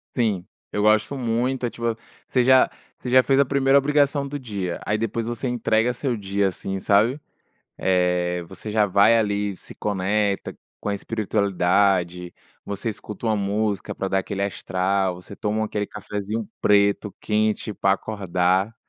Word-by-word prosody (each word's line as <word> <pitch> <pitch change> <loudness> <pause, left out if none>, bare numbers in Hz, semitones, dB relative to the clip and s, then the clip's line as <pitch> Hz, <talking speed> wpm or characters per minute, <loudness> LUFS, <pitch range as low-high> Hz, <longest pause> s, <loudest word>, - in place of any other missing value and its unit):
Sim, 105 -7 0 0.3
eu 105 - -1
gosto 110 +6 +3
muito, 125 +1 -1
eh, - - 0
tipo, 115 -1 -2 0.3
você 125 -2 +3
já 130 0 +6 0.3
você 125 - -5
já 130 0 +6
fez 135 0 +3
a - - +7
primeira 140 +1 +4
obrigação 140 0 +2
do 145 +1 -4
dia, 100 -9 -4
aí 105 - +1
depois 115 +1 -2
você 120 +2 -3
entrega 120 -1 +1
seu 125 0 -2
dia, 100 -1 0
assim, 95 +1 -4
sabe? 110 +9 +3 0.6
Eh, 90 -1 +1
você 95 +3 -7
já 105 -1 +4
vai 100 +4 +5
ali, 105 -3 0
se - - -12
conecta 100 0 -1 0.3
com - - -4
a 100 - 0
espiritualidade, 95 -4 0 0.3
você 100 +3 -4
escuta 105 +1 -6
uma 110 -1 +2
música 100 +1 -1
pra 95 - -3
dar 95 - +1
aquele 100 +1 -3
astral, 95 -1 0
você 90 +3 -11
toma 110 +1 -1
aquele 105 -1 -2
cafézinho 105 +1 -4
preto 100 0 +3
quente 110 0 0
pra 95 -1 +2
acordar, 95 0 0
105 Hz, 160 wpm, -23 LUFS, 95-115 Hz, 0.6 s, a